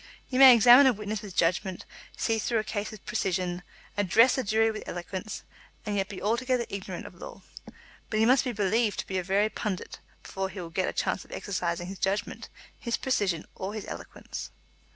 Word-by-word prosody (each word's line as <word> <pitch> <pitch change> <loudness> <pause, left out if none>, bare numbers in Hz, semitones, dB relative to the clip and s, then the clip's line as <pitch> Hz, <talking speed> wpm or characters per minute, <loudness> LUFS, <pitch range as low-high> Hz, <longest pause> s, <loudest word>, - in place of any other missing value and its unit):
He 255 - -2
may 265 -2 +11
examine 245 +4 +8
a 260 - +5
witness 210 0 -4
with 200 -4 -9
judgment, 185 +2 0 0.3
see 225 -1 0
through 230 +2 0
a 215 - +1
case 210 -1 -3
with 215 - -12
precision, 180 -1 -1 0.3
address 205 +5 +4
a 260 - -1
jury 220 +1 +2
with 215 - -6
eloquence, 185 +3 -6 0.4
and 210 -1 -2
yet 195 0 -1
be 195 - -7
altogether 240 +3 0
ignorant 200 -1 -6
of - - -10
law. - - -11 0.7
But 215 - -1
he 220 - +4
must 255 +3 +5
be 255 - -2
believed 210 +1 +1
to - - -14
be 190 -1 -1
a - - -3
very 195 +3 +2
pundit 210 -3 -5 0.2
before 190 0 -4
he 190 - -8
will 170 -2 -7
get 185 +2 0
a - - -5
chance - - -1
of - - -19
exercising 175 -3 -3
his 190 +1 -8
judgment, 200 +3 -2 0.3
his 235 -1 -2
precision, 195 -11 0
or 195 +3 -5
his 215 - -5
eloquence. - - -7
205 Hz, 200 wpm, -28 LUFS, 190-225 Hz, 0.7 s, may